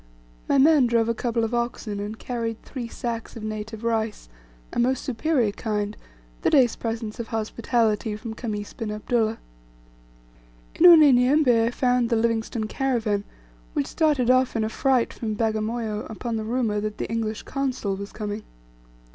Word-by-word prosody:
My - - +4
men 285 -2 +6
drove 230 -1 +2
a - - +2
couple 230 0 -1
of 225 +1 -2
oxen, 235 -3 -2
and 210 +2 -5
carried 230 -2 -4
three 250 -4 -6
sacks 230 -1 -5
of 225 - -8
native 215 +1 -5
rice 225 - -1 0.4
a - - -1
most 255 +2 +1
superior 260 -3 +1
kind 210 -1 -3 0.5
the - - +2
day's 255 -6 +4
presents 225 0 -4
of 235 - -4
hospitality 225 -1 0
from 220 +1 -6
Khamis 210 -3 -5
bin 225 -3 -5
Abdullah. 220 +1 0 1.4
In 355 - +6
Unyanyembe 270 -6 +6
I - - +2
found 245 -1 +1
the 235 - +2
Livingstone 225 0 0
caravan, 220 -4 -1 0.5
which 140 - 0
started 285 -6 +2
off 255 -1 +3
in 225 - +1
a 215 - -1
fright 255 +1 +1
from 215 -2 -3
Bagamoyo 220 0 -2
upon 230 +2 -4
the 220 -1 -3
rumour 225 -3 0
that 210 0 -4
the - - -3
English 220 -1 -3
Consul 260 -8 -2
was 200 +1 -7
coming. 210 0 -4
230 Hz, 160 wpm, -24 LUFS, 215-245 Hz, 1.4 s, men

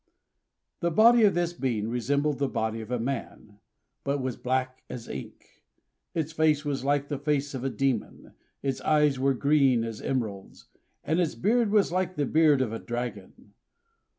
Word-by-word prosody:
The 170 - +1
body 225 +6 +6
of 200 - +3
this 175 0 0
being 120 -9 -2
resembled 140 +5 0
the 140 - +1
body 110 -1 -2
of 110 - -9
a 125 - 0
man, 115 -4 -5 0.4
but 140 0 -1
was 130 -2 -3
black 130 0 -2
as 120 -2 -7
ink; - - -10 0.5
its 160 -2 -1
face 155 -2 +2
was 140 -3 -2
like 145 0 +1
the 145 -2 -3
face 145 -1 -1
of 130 -2 -5
a 135 - 0
demon; 135 -4 -2 0.3
its 135 -2 -2
eyes 150 -3 +3
were 135 0 +2
green 135 -4 +3
as 115 -2 -5
emeralds; 110 -7 -4 0.3
and 160 +3 0
its 170 -4 0
beard 230 +3 +2
was 205 -4 +3
like 185 0 -1
the 145 - 0
beard 150 -2 +4
of 115 -3 -4
a 115 - -4
dragon. 120 +1 -6
140 Hz, 175 wpm, -27 LUFS, 125-155 Hz, 0.5 s, body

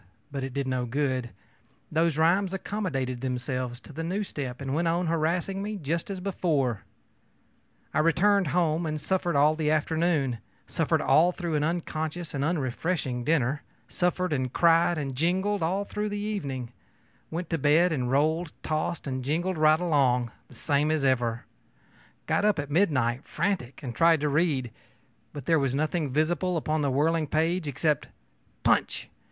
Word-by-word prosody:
But 135 -1 -3
it 135 0 -5
did 140 -1 -1
no 130 -1 -1
good; 130 -1 -1 0.6
those 160 -1 +2
rhymes 185 +4 +3
accommodated 140 - -3
themselves 125 -1 -3
to - - -13
the 165 - -4
new 190 +5 -1
step 130 -9 -5
and 135 -1 -3
went 165 +3 +1
on 170 +2 +1
harassing 170 +4 0
me 210 +1 -3
just 165 +1 -2
as 195 -2 -4
before. 155 - 0 1.1
I - - +2
returned 190 +4 +3
home, 165 0 +1
and 155 0 -2
suffered 175 0 -1
all 150 +2 +4
the 155 -1 0
afternoon; 155 -5 +1 0.3
suffered - - +1
all 170 +3 +5
through 175 -2 -4
an 150 -1 +1
unconscious 160 0 -3
and 140 -1 -1
unrefreshing 140 -3 -1
dinner; 145 -1 +1 0.3
suffered, 180 -1 0
and 130 -3 -1
cried, 170 +2 +4
and 135 -3 -3
jingled 190 +7 +1
all 190 +5 0
through 210 +1 -3
the 205 - -3
evening; 140 - -3 0.6
went 170 +1 -5
to 165 - 0
bed 155 +5 +4
and 125 -5 -1
rolled, 155 +4 +1
tossed, 155 +2 -2
and 130 -2 -3
jingled 165 +5 -1
right 155 0 +5
along, 130 -8 +2 0.2
the - - -17
same 145 0 +1
as 155 -3 +1
ever; 120 -3 +1 0.8
got - - +1
up 210 -2 +3
at 145 -1 -4
midnight 135 -8 +2
frantic, 170 -9 -2
and 125 -3 -4
tried 165 +5 +4
to 150 - +1
read; 140 -5 +1 0.6
but 145 -3 -8
there 165 +1 +3
was 135 -2 0
nothing 155 0 -1
visible 165 +4 +1
upon 155 0 -1
the 140 - +1
whirling 155 +4 +1
page 160 +3 0
except 145 +1 0 0.6
ōPunch! - - +2
155 Hz, 165 wpm, -27 LUFS, 135-175 Hz, 1.1 s, all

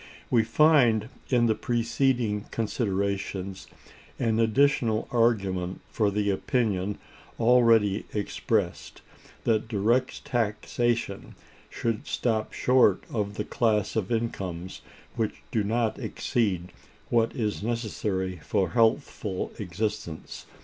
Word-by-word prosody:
We 115 -3 +5
find 120 -3 +4 0.2
in 120 -2 +3
the 110 - +3
preceding 120 -2 0
considerations 100 -3 -2 0.5
an 115 -2 +1
additional 115 -1 +2
argument 95 -7 +1
for 105 -2 +2
the 100 0 0
opinion, 105 -3 0 0.4
already 115 -4 +4
expressed, 105 -2 -2 0.4
that 110 -1 +1
direct 115 +4 0
taxation 115 -2 -1 0.3
should 115 -2 -3
stop 110 -3 -1
short 125 -6 +3
of 105 -2 -2
the 105 - -3
class 110 -4 +1
of 110 -2 -1
incomes 95 -6 -3 0.3
which 110 -2 -2
do 110 - +1
not 115 +2 0
exceed 95 -7 -1 0.4
what 115 +1 +2
is 110 -6 -2
necessary 105 -5 -2
for 95 +4 -1
healthful 110 -4 +1
existence. 105 -3 -4
110 Hz, 100 wpm, -27 LUFS, 100-120 Hz, 0.5 s, We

